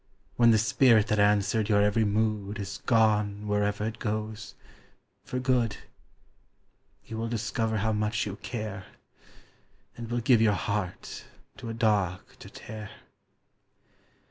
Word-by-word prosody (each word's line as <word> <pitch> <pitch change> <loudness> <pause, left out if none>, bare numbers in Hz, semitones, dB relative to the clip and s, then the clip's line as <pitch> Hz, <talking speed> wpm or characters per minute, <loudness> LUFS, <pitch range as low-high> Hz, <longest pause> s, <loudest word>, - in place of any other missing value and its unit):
When 120 -1 +5
the 110 - +6
spirit 110 -1 +4
that 105 - +1
answered 105 +1 +2
your 100 -1 +4
every 105 +2 +2
mood 105 -1 -1
Is 100 -1 -6
gone 105 -3 +2
wherever 105 0 0
it 110 +1 -4
goes 110 0 -4 0.7
for 125 - -5
good, 125 -4 +1 1.3
You 110 - -7
will 115 +1 -2
discover 110 0 -1
how 110 +2 0
much 105 0 -1
you 100 -1 -5
care, 105 -4 -6 1.1
And 115 -1 -8
will 120 0 -1
give 120 -1 +4
your 110 -2 +4
heart 95 0 -4 0.3
to 125 -4 -7
a 115 - -4
dog 105 -6 +1 0.2
to - - -11
tear! 110 -2 -9
105 Hz, 135 wpm, -28 LUFS, 105-115 Hz, 1.3 s, the